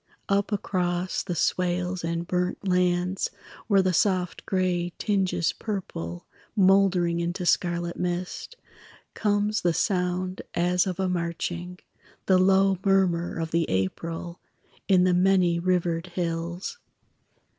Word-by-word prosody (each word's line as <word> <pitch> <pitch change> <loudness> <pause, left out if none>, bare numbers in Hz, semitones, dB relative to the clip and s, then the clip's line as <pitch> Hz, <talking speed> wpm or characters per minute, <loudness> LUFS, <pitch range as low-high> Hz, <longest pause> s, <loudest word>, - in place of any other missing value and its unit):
Up 200 +1 +1
across 180 -3 -1
the 180 -3 -4
swales 180 +1 0
and 170 +1 -2
burnt 180 +2 -2
lands 180 0 +1 0.4
Where 200 -3 +4
the 185 -1 +1
soft 185 -1 0
gray 180 -2 0
tinges 190 -5 0
purple, 85 - -5 0.3
Mouldering 190 -3 +4
into 175 +2 -2
scarlet 175 0 +1
mist, 180 - -3 0.6
Comes 210 0 +1
the 170 -2 +1
sound 185 0 -1
as 180 +2 +2
of 185 -1 -3
a 190 - +1
marching, 175 0 -3 0.5
The 185 -1 +4
low 190 0 +4
murmur 185 -4 +2
of 165 -1 -3
the 165 0 +1
April 165 - -3 0.5
In 185 -2 +5
the 180 0 +3
many 180 -2 +3
rivered 175 -1 0
hills. 175 - -4
180 Hz, 120 wpm, -26 LUFS, 170-190 Hz, 0.6 s, In